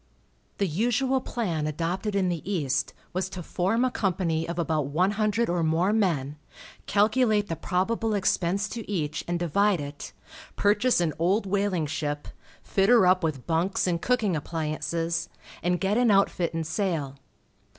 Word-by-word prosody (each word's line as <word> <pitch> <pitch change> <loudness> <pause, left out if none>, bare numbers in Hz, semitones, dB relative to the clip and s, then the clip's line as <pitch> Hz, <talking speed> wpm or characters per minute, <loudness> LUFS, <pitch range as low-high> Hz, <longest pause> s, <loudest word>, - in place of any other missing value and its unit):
The 200 - +1
usual 245 - +1
plan 170 -13 -2
adopted 175 +7 -2
in 190 -2 +2
the 175 -3 -2
East 145 -9 -1 0.2
was 185 +1 -1
to 185 -2 -7
form 195 +9 0
a 255 - 0
company 170 -6 -1
of 170 - -4
about 155 -4 0
one 175 +7 +1
hundred 215 +2 +1
or 175 0 0
more 165 +5 +2
men, 155 -10 0 0.5
calculate 215 0 +2
the 165 - -1
probable 215 +6 -1
expense 195 0 +1
to 230 -3 -7
each, 155 -5 -2
and 175 0 0
divide 185 +3 +2
it, 145 0 -7 0.4
purchase 210 +1 +3
an 160 -3 0
old 195 +6 +2
whaling 195 -4 0
ship, 145 -1 -3 0.4
fit 195 +1 +1
her 240 -5 +6
up 185 0 +4
with 150 -6 -2
bunks 170 +3 0
and 170 -2 0
cooking 225 -7 +1
appliances, 165 +2 -2 0.3
and 180 +1 0
get 200 +4 +1
an 245 -2 +4
outfit 195 -4 +2
and 165 -1 -3
sail. 160 -6 -2
180 Hz, 160 wpm, -26 LUFS, 160-205 Hz, 0.5 s, her